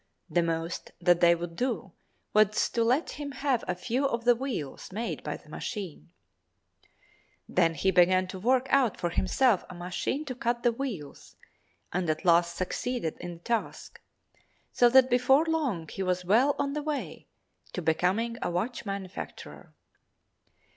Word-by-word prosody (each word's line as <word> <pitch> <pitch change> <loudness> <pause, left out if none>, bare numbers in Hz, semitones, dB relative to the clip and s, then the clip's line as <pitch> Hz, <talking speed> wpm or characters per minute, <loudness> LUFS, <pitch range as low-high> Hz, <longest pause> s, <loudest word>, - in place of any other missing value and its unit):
The 175 - +3
most 165 0 -3
that 175 -1 +4
they 170 0 +6
would 170 0 -6
do 215 -5 -2 0.4
was 215 0 +3
to 230 - +1
let 255 +8 +1
him 285 -1 -5
have 260 -2 0
a 180 - -1
few 250 +9 0
of 235 -3 -3
the 245 - +7
wheels 235 - -5
made 225 +5 -3
by - - -4
the - - -22
machine. 190 - -6 1.4
Then 165 -2 +2
he 190 +6 +2
began 185 +1 +4
to 190 - -6
work 255 +5 +2
out 260 -6 +3
for 175 - -1
himself 210 +4 +2
a 185 - -8
machine 180 +12 -3
to 265 - -4
cut 240 -1 -2
the 240 - +4
wheels, 225 - -6 0.6
and 175 -1 -1
at 155 +4 -1
last 170 0 +4
succeeded 185 0 -2
in 175 0 -6
the 170 - -12
task, 235 -2 -3 0.7
so 245 - +5
that 260 +1 +6
before 260 +4 +4
long 280 - -1
he 195 - -6
was 180 -1 -1
well 245 +10 +4
on 280 0 -1
the 300 - -2
way 295 -1 -4 0.5
to 180 - -4
becoming 190 +9 +1
a - - -1
watch 215 +7 -3
manufacturer. 195 -2 -7
210 Hz, 160 wpm, -28 LUFS, 175-250 Hz, 1.4 s, the